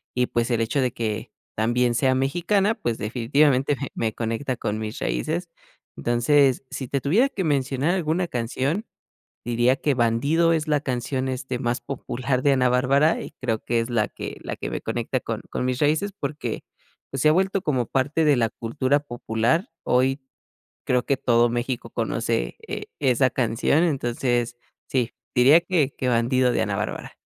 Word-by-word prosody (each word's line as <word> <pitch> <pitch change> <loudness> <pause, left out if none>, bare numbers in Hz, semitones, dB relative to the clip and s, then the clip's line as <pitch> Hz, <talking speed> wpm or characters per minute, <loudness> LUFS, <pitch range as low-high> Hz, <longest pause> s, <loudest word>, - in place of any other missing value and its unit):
y 125 0 +2
pues 120 0 -1
el 115 -1 +1
hecho 120 +5 0
de 125 -2 0
que 110 -3 -3 0.2
también 120 +2 +2
sea 130 +2 +2
mexicana 175 +10 +1
pues 120 - -3
definitivamente 130 +5 +2
me 140 - -4
me 110 -2 -1
conecta 115 +3 -2
con 105 +1 -2
mis 110 0 -5
raíces. 170 +3 -2 0.5
Entonces, 130 +3 +3
si 130 - -5
te 140 +2 -1
tuviera 210 - +3
que 200 -8 -3
mencionar 140 +1 +1
alguna 175 0 0
canción, 135 - -2 0.6
diría 120 +2 +2
que 145 +1 0
"Bandido" 140 +8 +2
es 160 -2 0
la 150 -2 +2
canción, 130 0 -2
este, 130 -1 -3
más 120 +1 -1
popular 130 -1 -3
de 145 - +4
Ana 130 -2 +3
Bárbara 135 +5 +3
y - - -7
creo 115 -4 -1
que 120 - 0
es 115 +1 -1
la 110 -3 +1
que - - -7
la - - -5
que - - -5
me - - -3
conecta - - -2
con - - -4
con - - -2
mis 125 -1 -1
raíces 155 +7 +1
porque 140 - -4 0.5
pues 135 - -3
se 150 - +5
ha - - +6
vuelto 190 +2 +1
como 130 - 0
parte 145 +6 +1
de 150 -1 +5
la 115 -2 +2
cultura 130 +5 0
popular. 120 - -1 0.2
Hoy 130 +2 +2 0.7
creo 125 -1 +2
que 140 - +1
todo 120 -1 +3
México 120 +1 -3
conoce, - - -1
e - - -5
esa 130 -1 +3
canción. 125 +6 +1
Entonces, 120 -5 0 0.3
sí, 125 -3 0 0.2
diría 135 +7 +7
que 170 -6 +1
que 130 - -2
"Bandido" 125 +2 +2
de - - 0
Ana 105 -2 -2
Bárbara. 105 +1 -4
130 Hz, 175 wpm, -24 LUFS, 120-145 Hz, 0.7 s, diría